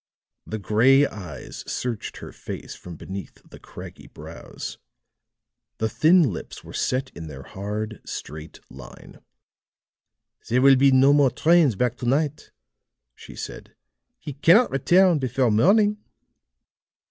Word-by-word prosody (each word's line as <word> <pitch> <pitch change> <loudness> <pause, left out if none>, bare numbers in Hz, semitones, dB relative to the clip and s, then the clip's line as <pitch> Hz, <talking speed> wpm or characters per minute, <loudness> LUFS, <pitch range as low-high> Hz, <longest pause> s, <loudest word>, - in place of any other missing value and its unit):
The 110 - -4
gray 120 +8 +4
eyes 90 - -8
searched 120 -4 -4
her - - -9
face - - -8
from 90 -1 -11
beneath 95 +4 -9
the - - -14
craggy - - -12
brows; - - -9 1.0
the 110 - -1
thin 160 - +4
lips - - -9
were - - -12
set 130 +1 -2
in 80 -1 -9
their 70 -3 -9
hard, 105 - -6
straight 75 +1 -8
line. 65 -1 -14 1.3
"There 125 +3 +1
will 135 0 +7
be 135 +2 +4
no 135 +2 +5
more 145 -2 +4
trains 155 0 +3
back 125 +2 -1
to 120 - -5
night," 145 +3 -1 0.6
she - - -13
said. - - -9 0.4
"He 145 - -8
cannot 170 - +4
return 175 +5 +3
before 130 -2 0
morning." 205 - +3
130 Hz, 130 wpm, -23 LUFS, 105-145 Hz, 1.3 s, will